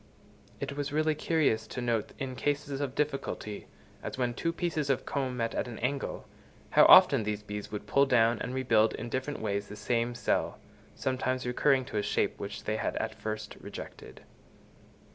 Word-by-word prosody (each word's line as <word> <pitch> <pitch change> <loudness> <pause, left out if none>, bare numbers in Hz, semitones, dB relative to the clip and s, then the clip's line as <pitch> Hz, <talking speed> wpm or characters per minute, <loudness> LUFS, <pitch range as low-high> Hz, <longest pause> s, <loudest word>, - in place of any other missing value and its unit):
It 140 - -4
was 145 0 -3
really 155 +1 +2
curious 145 -8 +1
to 125 - -6
note 120 -3 -1
in 130 -2 -4
cases 145 +1 -1
of 135 -2 -3
difficulty, 140 -7 -3 0.3
as - - -5
when 125 -2 0
two 165 +7 -1
pieces 165 -4 -2
of 135 - +1
comb 130 -3 -2
met 115 -1 -1
at - - -1
an 120 - -7
angle, 135 +3 -3 0.4
how - - +7
often - - +9
the 105 0 -1
bees 105 0 -7
would 105 - -5
pull 140 0 +3
down 115 -3 +4
and - - -3
rebuild 115 -4 +3
in 120 - -6
different 130 +4 -3
ways 100 -1 -1
the 105 - -8
same 120 +3 -1
cell, 120 - 0 0.4
sometimes 130 -1 -1
recurring 130 +2 +2
to 120 - -5
a - - +2
shape 105 0 0
which 100 - -6
they 110 +1 -1
had - - -2
at - - -2
first 110 0 -5
rejected. - - -9
125 Hz, 180 wpm, -30 LUFS, 110-140 Hz, 0.4 s, often